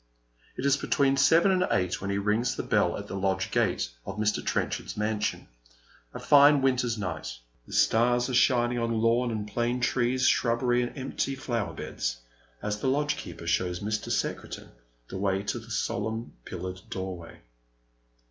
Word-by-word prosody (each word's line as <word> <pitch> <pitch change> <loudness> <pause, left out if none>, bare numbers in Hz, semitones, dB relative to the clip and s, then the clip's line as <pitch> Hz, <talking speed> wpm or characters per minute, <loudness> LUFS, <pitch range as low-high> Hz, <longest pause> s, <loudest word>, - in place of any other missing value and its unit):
It 130 - -3
is 140 0 +4
between 140 -1 +2
seven 160 +7 +5
and 185 -1 +2
eight 90 0 0
when 100 - -3
he 100 - 0
rings 105 +5 +1
the - - -3
bell - - +1
at - - -6
the - - -7
lodge 95 -1 -1
gate - - +1 0.2
of 95 - -7
Mr. 105 0 0
Trenchard's - - -2
mansion, 105 0 -1 0.6
a - - -7
fine 145 -1 +6
winter's 125 -3 +1
night. 90 - -4 0.3
The - - -10
stars 120 - +3
are 130 - -4
shining 120 -1 +3
on 115 -1 0
lawn 115 +2 +2
and 110 -2 -3
plane 120 +3 -1
trees, 125 +1 +1
shrubbery 120 +1 +2
and 120 +4 -4
empty 135 +1 -2
flower 115 -10 -3
beds, - - -3 0.5
as 105 0 -2
the 135 - -2
lodgekeeper 145 - -1
shows 90 +1 0
Mr. 105 +1 -2
Secretan - - -3 0.4
the 95 - -6
way 95 0 0
to 120 - -2
the 115 0 -14
solemn 110 +1 -2
pillared 90 0 -6
doorway. 95 -3 -6
115 Hz, 165 wpm, -28 LUFS, 100-125 Hz, 0.6 s, fine